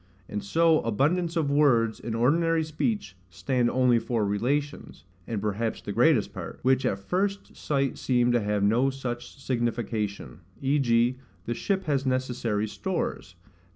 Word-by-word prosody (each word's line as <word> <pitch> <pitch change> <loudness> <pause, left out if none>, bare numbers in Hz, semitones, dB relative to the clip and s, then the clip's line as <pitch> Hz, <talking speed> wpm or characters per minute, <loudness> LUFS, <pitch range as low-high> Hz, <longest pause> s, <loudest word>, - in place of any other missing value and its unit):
And 105 - -4
so 165 +9 +3
abundance 165 - 0
of 155 -4 +1
words, 120 -7 +3
in 115 -1 -4
ordinary 165 +7 +2
speech, 155 - -2
stand 125 +5 0
only 125 -2 +3
for 115 -1 -1
relations 135 +9 -2 0.2
(and 115 -3 -2
perhaps 105 +2 -2
the - - -6
greatest - - +3
part) - - -7
which 130 +1 +3
at 95 - 0
first 195 - -2
sight 140 -3 -1
seem 125 -1 +2
to 120 -1 +2
have 105 -1 0
no 120 +6 +3
such 125 -2 -6
signification: 115 -8 -2 0.2
v.g. 130 -3 +2 0.3
the 120 - -1
ship 190 - -1
has 140 -4 0
necessary 125 -5 -1
stores. 170 - -4
125 Hz, 145 wpm, -27 LUFS, 115-145 Hz, 0.3 s, so